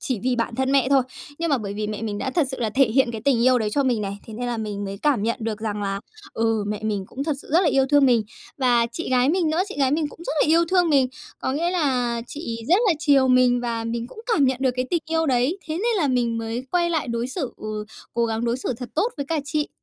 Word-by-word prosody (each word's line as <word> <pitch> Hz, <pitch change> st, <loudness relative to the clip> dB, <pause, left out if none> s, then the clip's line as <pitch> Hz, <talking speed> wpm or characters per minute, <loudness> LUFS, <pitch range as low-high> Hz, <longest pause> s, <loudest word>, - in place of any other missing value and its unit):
chỉ 235 Hz, 0 st, -1 dB
vì 255 Hz, -1 st, +1 dB
bản 230 Hz, 0 st, -1 dB
thân 265 Hz, +2 st, 0 dB
mẹ 270 Hz, -2 st, +3 dB
thôi. 275 Hz, -2 st, +4 dB, 0.4 s
Nhưng 335 Hz, -1 st, -1 dB
mà 280 Hz, -, +3 dB
bởi 200 Hz, -3 st, -5 dB
vì 210 Hz, 0 st, -2 dB
mẹ 210 Hz, +1 st, -5 dB
mình 210 Hz, -2 st, -3 dB
đã 265 Hz, -, -2 dB
thật 300 Hz, 0 st, +1 dB
sự 265 Hz, -, -4 dB
là 220 Hz, -2 st, 0 dB
thể 270 Hz, +4 st, +4 dB
hiện 245 Hz, +1 st, +2 dB
cái 225 Hz, -2 st, -5 dB
tình 250 Hz, -4 st, +3 dB
yêu 255 Hz, 0 st, +5 dB
đấy 215 Hz, -2 st, -1 dB
cho 280 Hz, -, +1 dB
mình 245 Hz, -4 st, +1 dB
này, 200 Hz, -1 st, -4 dB
thế 220 Hz, -, -8 dB
nên 245 Hz, +2 st, -4 dB
là 240 Hz, -1 st, -2 dB
mình 205 Hz, -2 st, -4 dB
mới 195 Hz, 0 st, -5 dB
cảm 275 Hz, -4 st, +1 dB
nhận 230 Hz, +2 st, 0 dB
được 220 Hz, -1 st, -3 dB
rằng 210 Hz, -2 st, -3 dB
là, 195 Hz, 0 st, -2 dB, 0.3 s
ừ, 225 Hz, -2 st, 0 dB
mẹ 210 Hz, 0 st, -3 dB
mình 210 Hz, -3 st, -2 dB
cũng 275 Hz, +2 st, -5 dB
thật 315 Hz, -, 0 dB
sự -, -, -16 dB
rất 340 Hz, -, +6 dB
là 345 Hz, -, +3 dB
yêu 270 Hz, -1 st, +3 dB
thương 285 Hz, -2 st, +5 dB
mình. 235 Hz, -3 st, +4 dB, 0.4 s
Và 240 Hz, -3 st, +3 dB
chị 330 Hz, -, -3 dB
gái 255 Hz, +1 st, +3 dB
mình 335 Hz, -1 st, +2 dB
nữa, 325 Hz, +4 st, +2 dB
chị -, -, -7 dB
gái 270 Hz, -2 st, +3 dB
mình 300 Hz, +1 st, 0 dB
cũng -, -, -15 dB
rất -, -, -2 dB
là -, -, +2 dB
yêu 330 Hz, +2 st, +5 dB
thương 360 Hz, -3 st, +3 dB
mình, 275 Hz, -3 st, +4 dB, 0.3 s
có 260 Hz, -, -1 dB
nghĩa 340 Hz, +5 st, 0 dB
là 250 Hz, -9 st, 0 dB
chị 235 Hz, -6 st, -5 dB
rất 355 Hz, +4 st, +5 dB
là -, -, +5 dB
chiều 280 Hz, -4 st, +4 dB
mình 250 Hz, -1 st, +4 dB
và 230 Hz, -2 st, -2 dB
mình 230 Hz, +1 st, -3 dB
cũng 440 Hz, -, -11 dB
cảm 285 Hz, -, +3 dB
nhận 260 Hz, -1 st, +2 dB
được 260 Hz, -2 st, +3 dB
cái 255 Hz, -, 0 dB
tình 340 Hz, -2 st, +1 dB
yêu 325 Hz, 0 st, +1 dB
đấy. 260 Hz, +7 st, +1 dB
Thế 310 Hz, -, -3 dB
nên 450 Hz, +6 st, 0 dB
là 315 Hz, -7 st, +1 dB
mình 240 Hz, -3 st, +1 dB
mới 225 Hz, +2 st, -3 dB
quay 345 Hz, -1 st, +1 dB
lại 315 Hz, -6 st, -1 dB
đối 235 Hz, 0 st, -1 dB
xử, 265 Hz, -1 st, -3 dB
ừ, 215 Hz, 0 st, -5 dB, 0.3 s
cố 235 Hz, 0 st, +2 dB
gắng 225 Hz, +1 st, -2 dB
đối 235 Hz, +1 st, 0 dB
xử 260 Hz, -, -2 dB
thật 250 Hz, 0 st, -7 dB
tốt 440 Hz, +10 st, +1 dB
với 280 Hz, -, -4 dB
cả 320 Hz, +1 st, 0 dB
chị. 295 Hz, +1 st, -1 dB
255 Hz, 295 wpm, -23 LUFS, 230-290 Hz, 0.4 s, rất